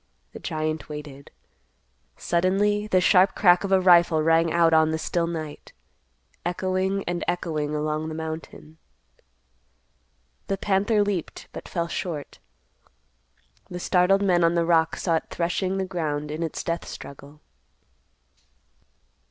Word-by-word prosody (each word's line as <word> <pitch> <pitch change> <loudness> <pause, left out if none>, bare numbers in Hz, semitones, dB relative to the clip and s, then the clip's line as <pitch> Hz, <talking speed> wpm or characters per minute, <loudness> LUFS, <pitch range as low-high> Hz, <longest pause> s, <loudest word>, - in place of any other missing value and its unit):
The - - -8
giant 155 0 -3
waited. 150 -2 -9 0.9
Suddenly 200 +4 +1
the 185 -3 +3
sharp 185 +1 +4
crack 180 -2 +4
of 195 - -3
a 190 - +5
rifle 170 -3 +5
rang 165 +1 +3
out 165 -1 +3
on 160 0 +5
the 160 - -1
still 170 +1 -1
night, 155 -3 -7 0.7
echoing 185 +2 -1
and 175 0 -3
echoing 155 -4 -2
along 155 +1 -2
the 155 - -6
mountain. 160 0 -7 1.7
The 195 - -1
panther 205 +2 +2
leaped, 200 -5 -4
but - - -9
fell 170 -2 -2
short. 165 -4 -5 1.3
The 180 - -6
startled 185 +3 +3
men 175 -3 +3
on 165 +1 +3
the 170 -1 +2
rock 165 -1 +2
saw 165 -3 0
it - - -7
threshing 185 +2 -1
the 190 - -1
ground 150 -5 -3
in 155 +2 -5
its 165 -2 -3
death 170 0 -3
struggle. 140 +1 -10
170 Hz, 135 wpm, -25 LUFS, 155-185 Hz, 1.7 s, a